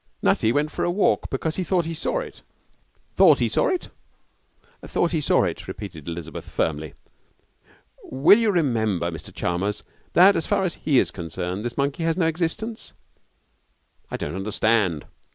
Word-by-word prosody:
'Nutty 110 - +3
went 145 +4 0
for - - -3
a - - +1
walk 195 +4 +1
because 160 -1 -2
he 185 - 0
thought 180 -2 +1
he 165 - -3
saw 165 - -2
it.' 485 - -10 0.8
'Thought - - +7
he - - +1
saw - - +1
it?' 370 -1 -2 0.9
'Thought 175 - 0
he 160 -3 0
saw - - +3
it,' - - -3
repeated 85 -8 -8
Elizabeth, 85 -2 -6
firmly. 75 -2 -2 1.1
'Will 145 - +5
you 225 -2 +2
remember, 110 - +1
Mr 80 - -8
Chalmers, 95 +4 -2 0.3
that, 190 +3 +7
as 165 - -1
far 200 -2 +1
as 180 -3 -2
he 145 -4 +3
is - - +3
concerned, 90 +3 -5
this 120 0 -4
monkey 140 +3 -1
has 165 0 0
no 180 - +2
existence?' 175 +8 -2 1.2
'I - - -3
don't - - -4
understand.' 100 -4 +1
140 Hz, 165 wpm, -24 LUFS, -, 1.2 s, Thought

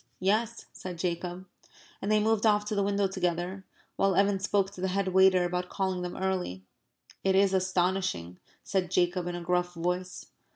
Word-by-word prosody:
"Yes," 215 +5 0
said 180 -2 -7
Jacob. 175 +1 -3 0.6
And 200 - -1
they 215 - +5
moved 220 0 +2
off 210 -1 +3
to 210 - -3
the 200 - +1
window 200 0 +1
together, 185 0 -2 0.3
while 195 -2 +2
Evan 200 +1 +3
spoke 195 0 +1
to 190 - -10
the 190 - +1
head 190 +1 0
waiter 190 -1 +5
about 180 0 -2
calling 190 -2 -1
them 180 0 -5
early. 185 - -2 0.6
"It 190 0 +3
is 195 0 +4
astonishing," 185 - 0 0.2
said 185 -3 -1
Jacob, 175 0 +1
in 175 - -3
a 175 - -5
gruff 180 0 0
voice. 180 +2 -3
185 Hz, 175 wpm, -29 LUFS, 180-195 Hz, 0.6 s, they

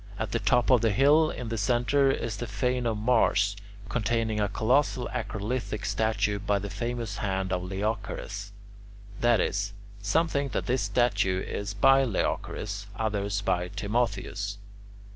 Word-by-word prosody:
At 110 -2 -3
the 115 - 0
top 120 +1 +2
of 125 -3 +6
the 115 - +3
hill, 145 +9 +5
in 120 -2 -5
the 115 -1 -2
centre, 125 +6 +2
is 115 -5 -1
the 120 - -4
fane 125 +3 0
of 110 -2 0
Mars, 105 -3 +3 0.3
containing 115 -1 0
a 100 - +1
colossal 125 +5 +1
acrolithic 105 -1 -3
statue 110 -2 0
by 100 0 +1
the 100 0 -5
famous 120 -3 -3
hand 95 -2 -1
of 90 - 0
Leochares. 100 +1 -4 0.7
That 120 -2 +4
is, 100 +2 -1 0.3
some 160 +12 +2
think 140 -4 -2
that - - -1
this 130 +1 +1
statue 100 -6 +1
is 100 0 -4
by 135 +6 +5
Leochares, 100 -3 -2
others 100 -2 -1
by 90 -3 0
Timotheus. 100 -1 -2
110 Hz, 150 wpm, -28 LUFS, 100-120 Hz, 0.7 s, of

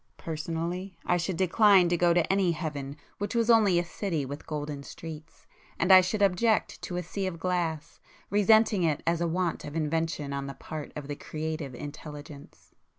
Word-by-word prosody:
Personally 170 +4 -4
I 175 - +2
should 175 0 -2
decline 190 0 +5
to 175 - +2
go 175 0 +3
to 170 -1 +3
any 190 -3 +2
heaven 145 -3 -5 0.2
which 205 +4 -3
was 230 0 +3
only 210 -6 +5
a 175 - +1
city 170 -5 -3
with 145 +3 -8
golden 150 -2 -4
streets; 155 +3 -10 0.3
and 190 - +2
I 185 - +10
should 200 +3 0
object 210 +4 +2
to 175 - -4
a 180 - -2
sea 190 +3 -3
of 175 -3 -4
glass, 165 -3 -2 0.3
resenting 210 0 +4
it 160 -4 0
as 170 0 +1
a 170 - +1
want 175 0 -1
of 145 - -7
invention 160 -2 -1
on 140 0 -3
the 140 - -7
part 155 -2 -7
of 150 -2 -6
the 145 - -4
creative 155 -3 -5
Intelligence. 145 0 -10
165 Hz, 185 wpm, -28 LUFS, 150-185 Hz, 0.3 s, I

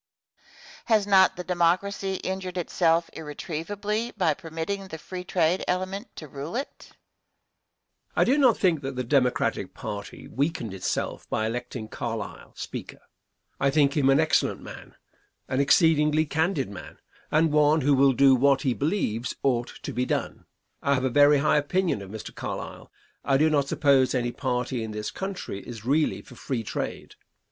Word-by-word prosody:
Has 220 -3 +3
not 190 -2 +5
the 180 - -5
Democracy 185 +3 0
injured 185 -1 -4
itself 170 -1 +2
irretrievably 200 +9 -4
by 170 -6 +3
permitting 170 +4 -5
the 160 - -7
free 180 +3 -7
trade 175 0 +1
element 185 +5 -3
to 155 - -8
rule 145 - -7
it? 270 +3 -5
Answer. - - -22 1.2
I - - +4
do 275 +4 +3
not 255 -5 +5
think 170 -6 +2
that 135 -1 -5
the 125 - -2
Democratic 125 0 +1
party 105 -2 -7
weakened 140 - -2
itself 95 -1 -3
by 110 - 0
electing 115 0 -4
Carlisle, 115 -2 -6
Speaker. - - -7 0.6
I 140 - +3
think 140 -1 +3
him 140 -3 +3
an 135 +2 +5
excellent 160 0 +1
man, - - -11 0.5
an 130 - -1
exceedingly 150 +1 +4
candid 155 - 0
man, 100 - -10 0.3
and 160 +1 +3
one 150 +1 +4
who 140 +2 +3
will 135 0 +5
do 135 +1 +6
what 135 +1 +3
he 130 - +2
believes 130 - -1
ought 120 -3 +1 0.2
to - - -5
be 125 +1 -1
done. - - -3 0.3
I 140 0 +2
have 130 - -1
a 130 - +1
very 145 +2 +6
high 150 +1 +3
opinion 165 - 0
of 95 - -9
Mr. 110 +1 -8
Carlisle. - - -6 0.3
I 135 -1 +3
do 155 +2 +3
not 140 -2 +2
suppose 135 -2 +3
any 120 -1 0
party 125 -2 -2
in 110 -1 -5
this 105 0 -4
country 190 - -5
is 115 0 -9
really 150 +4 +1
for - - -14
free 120 -1 -4
trade. - - -5
150 Hz, 165 wpm, -26 LUFS, 130-180 Hz, 1.2 s, do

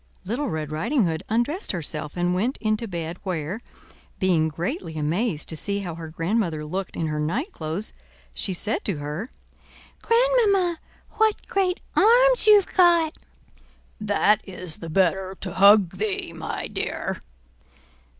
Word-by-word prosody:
Little 245 +8 -2
Red 155 -3 -4
Riding 225 - +1
Hood 160 -2 -2
undressed 240 - 0
herself 155 -2 -3
and 175 0 +1
went 225 +9 0
into 215 +1 -1
bed, 170 -2 -5
where, 180 +2 -3 0.6
being 175 -5 +2
greatly 165 +1 -4
amazed 155 +3 -1
to 160 - -2
see 200 +5 -1
how 175 -4 -5
her 165 0 -7
grandmother 165 -1 -1
looked 185 +4 -4
in 165 - -1
her 150 -1 -2
night 230 - -2
clothes, 160 - -5 0.4
she 195 - -2
said 205 +4 -2
to 195 -7 0
her: 150 - -5 0.7
"Grandmamma, 445 -8 +3 0.3
what 440 -1 +1
great 375 -2 0
arms - - +5
you've 415 -3 +6
got!" 340 -3 +4 0.8
"That 210 0 +3
is 180 -4 -4
the 165 - -8
better 190 +2 +1
to 185 -3 -5
hug 200 -2 +6
thee, 205 0 -2
my - - -5
dear." - - -4
195 Hz, 140 wpm, -24 LUFS, 165-260 Hz, 0.8 s, you've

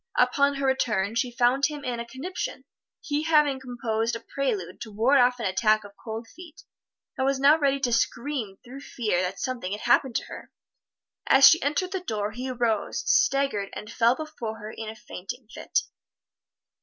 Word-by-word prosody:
Upon 280 +3 +3
her 275 0 -2
return 225 -6 +1
she 235 +2 0
found 245 +3 +2
him 295 -2 -7
in 245 -2 -2
a 235 - -5
conniption, 285 +10 -5 0.4
he 290 0 -1
having 300 -4 +3
composed 235 -3 -2
a - - -4
prelude 210 -12 -3
to 220 - -7
ward 240 +7 +3
off 250 0 +3
an 230 - -3
attack 215 +3 +2
of 205 -1 -12
cold 225 0 -6
feet, 335 +1 -14 0.6
and 265 - +2
was 275 -1 +1
now 290 +4 +6
ready 275 -2 +2
to 245 -3 +1
scream 235 -4 -1
through 260 +3 -9
fear 215 -10 -1
that 185 +1 -3
something 245 -8 -3
had 210 - -5
happened 240 +1 +2
to - - 0
her. - - -10 0.8
As 270 0 +8
she 330 - +6
entered 305 +6 -1
the 380 - -2
door 215 - -3
he 250 +4 -5
arose, 235 -4 -1
staggered 275 - +2
and 210 - -8
fell 235 +2 +3
before 260 -8 -6
her 215 0 -8
in 220 -1 -7
a 220 - -8
fainting 220 +1 -8
fit. - - -1
245 Hz, 185 wpm, -26 LUFS, 220-275 Hz, 0.8 s, As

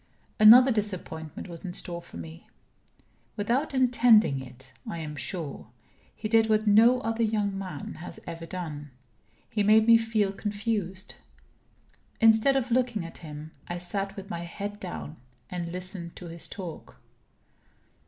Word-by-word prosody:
Another 245 +5 +9
disappointment 185 - -4
was 170 -2 -8
in 180 -2 -5
store 170 -1 -3
for - - -12
me. 80 -1 -10 0.9
Without 240 +9 0
intending 240 - +4
it, 130 +1 -12 0.2
I 170 - -4
am 155 -2 -6
sure, 150 - -5 0.5
he 215 - -4
did 225 0 +4
what 215 0 +2
no 230 +5 +6
other 225 0 -2
young 210 -3 0
man 185 -7 -6
has 175 - -7
ever 165 -1 -7
done 155 -5 -6 0.6
he 210 - -1
made 215 +2 +5
me 230 0 +7
feel 220 -3 0
confused. 205 -2 -3 1.1
Instead 225 +4 +5
of 260 -2 0
looking 240 -6 +1
at 165 - -10
him, 155 -1 -9 0.2
I 175 - -4
sat 195 +3 -3
with 195 -1 -8
my 170 - -3
head 200 +4 -6
down, 75 -2 -7 0.3
and 175 -2 -4
listened 180 -1 -6
to 175 - -9
his 165 0 -4
talk. 180 -5 -9
195 Hz, 145 wpm, -27 LUFS, 170-220 Hz, 1.1 s, Another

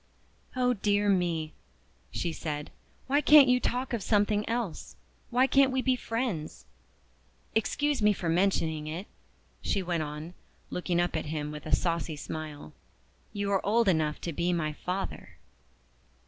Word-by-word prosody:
"Oh 250 -1 +2
dear 205 -1 +1
me!" 170 -5 +1 0.6
she 170 - -2
said, 150 -2 -4 0.3
"why 285 +2 +2
can't 295 -1 +8
you 250 0 +4
talk 250 +1 -2
of 230 - -1
something 210 +1 +1
else? 230 -8 -3 0.3
Why 250 +2 +4
can't 270 0 +4
we 260 0 0
be 260 -1 +3
friends? 225 - -3 0.9
Excuse 290 +4 +1
me 210 0 +5
for 185 -4 -3
mentioning 165 -3 +1
it," 165 +6 -4 0.6
she 195 - 0
went 175 -2 -1
on, 150 +3 -6 0.4
looking 180 -1 -1
up 175 -1 0
at 160 - -2
him 150 -1 -3
with 150 +1 -8
a - - +4
saucy 170 -2 -1
smile, 150 - -7 0.6
"you 200 -1 -2
are 195 - +1
old 225 +2 +2
enough 155 -4 +2
to 170 - -4
be 175 +3 0
my 155 -3 -1
father." 180 +5 -5
185 Hz, 150 wpm, -29 LUFS, 160-230 Hz, 0.9 s, can't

